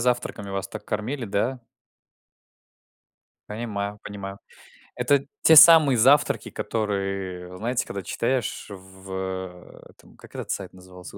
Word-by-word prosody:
завтраками 120 Hz, -4 st, -1 dB
вас 95 Hz, 0 st, -3 dB
так -, -, -9 dB
кормили, 120 Hz, +5 st, -3 dB
да? 115 Hz, +5 st, -2 dB, 1.9 s
Понимаю, 105 Hz, -2 st, -4 dB
понимаю. 100 Hz, -1 st, -7 dB, 0.6 s
Это 140 Hz, -1 st, +2 dB, 0.2 s
те 160 Hz, -1 st, +7 dB
самые 155 Hz, -4 st, +8 dB
завтраки, 135 Hz, +6 st, +4 dB
которые, 95 Hz, -4 st, -3 dB
знаете, 120 Hz, +4 st, -1 dB
когда 100 Hz, -, -6 dB
читаешь 120 Hz, +3 st, -2 dB
в 95 Hz, -1 st, -12 dB
э, 95 Hz, -1 st, -6 dB
этом- -, -, -21 dB
как -, -, -16 dB
этот -, -, -5 dB
сайт -, -, -4 dB
назывался, 90 Hz, -1 st, -13 dB
100 Hz, 120 wpm, -24 LUFS, 95-125 Hz, 1.9 s, самые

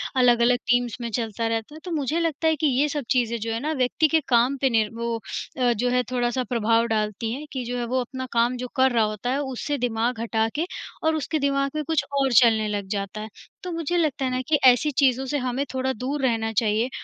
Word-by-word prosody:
अलग-अलग 245 Hz, -1 st, +4 dB
टीम्स 245 Hz, -2 st, +1 dB
में 235 Hz, -, -3 dB
चलता 225 Hz, 0 st, -2 dB
रहता 225 Hz, +4 st, -3 dB
है। -, -, -10 dB
तो 360 Hz, -, -5 dB
मुझे 305 Hz, 0 st, -1 dB
लगता 325 Hz, -1 st, 0 dB
है 320 Hz, -, +3 dB
कि 305 Hz, +1 st, +1 dB
ये 295 Hz, -, +3 dB
सब 290 Hz, -1 st, -3 dB
चीज़ें 235 Hz, -2 st, +2 dB
जो 225 Hz, +1 st, -3 dB
हैं 225 Hz, -, -2 dB
ना 305 Hz, +3 st, -1 dB
व्यक्ति 260 Hz, +3 st, +2 dB
के 320 Hz, +1 st, +3 dB
काम 245 Hz, +3 st, +3 dB
पे 270 Hz, -, +3 dB
नीर 220 Hz, -3 st, +2 dB
वो 235 Hz, 0 st, -2 dB, 0.4 s
अ, 245 Hz, -1 st, +3 dB
जो 240 Hz, +3 st, 0 dB
है 250 Hz, 0 st, +2 dB
थोड़ा-सा 245 Hz, 0 st, 0 dB
प्रभाव 230 Hz, -1 st, +2 dB
डालती 215 Hz, 0 st, -1 dB
हैं, 285 Hz, +4 st, -6 dB
कि 260 Hz, -2 st, -3 dB
जो 245 Hz, +1 st, -3 dB
है 240 Hz, -, -2 dB
वो 255 Hz, +2 st, 0 dB
अपना 260 Hz, +1 st, -5 dB
काम 235 Hz, +2 st, +2 dB
जो 250 Hz, +1 st, -4 dB
कर 260 Hz, 0 st, +4 dB
रहा 230 Hz, -2 st, +3 dB
होता 215 Hz, +3 st, -4 dB
है 270 Hz, -, 0 dB
उससे 280 Hz, +2 st, -3 dB
दिमाग 235 Hz, -1 st, -1 dB
हटा 225 Hz, -1 st, 0 dB
के 315 Hz, +3 st, 0 dB, 0.4 s
और 320 Hz, 0 st, +2 dB
उसके 310 Hz, +1 st, -2 dB
दिमाग 275 Hz, -1 st, 0 dB
में 305 Hz, -, -1 dB
कुछ 320 Hz, -2 st, +1 dB, 0.2 s
और 270 Hz, -1 st, +2 dB
चलने 220 Hz, -3 st, +5 dB
लग 205 Hz, -2 st, -3 dB
जाता 200 Hz, +2 st, -5 dB
है। 215 Hz, -, -7 dB, 0.3 s
तो 365 Hz, -, -4 dB
मुझे 335 Hz, +1 st, -1 dB
लगता 295 Hz, -5 st, 0 dB
है 255 Hz, -, -1 dB
ना 255 Hz, 0 st, -1 dB
कि 315 Hz, -, +4 dB
ऐसी 255 Hz, +4 st, +5 dB
चीज़ों 265 Hz, -1 st, +3 dB
से 290 Hz, +3 st, -1 dB
हमें 255 Hz, +1 st, -2 dB
थोड़ा 260 Hz, 0 st, 0 dB
दूर 265 Hz, +5 st, -3 dB
रहना 225 Hz, -3 st, +1 dB
चाहिए। 220 Hz, +2 st, +1 dB
250 Hz, 245 wpm, -24 LUFS, 230-275 Hz, 0.4 s, चलने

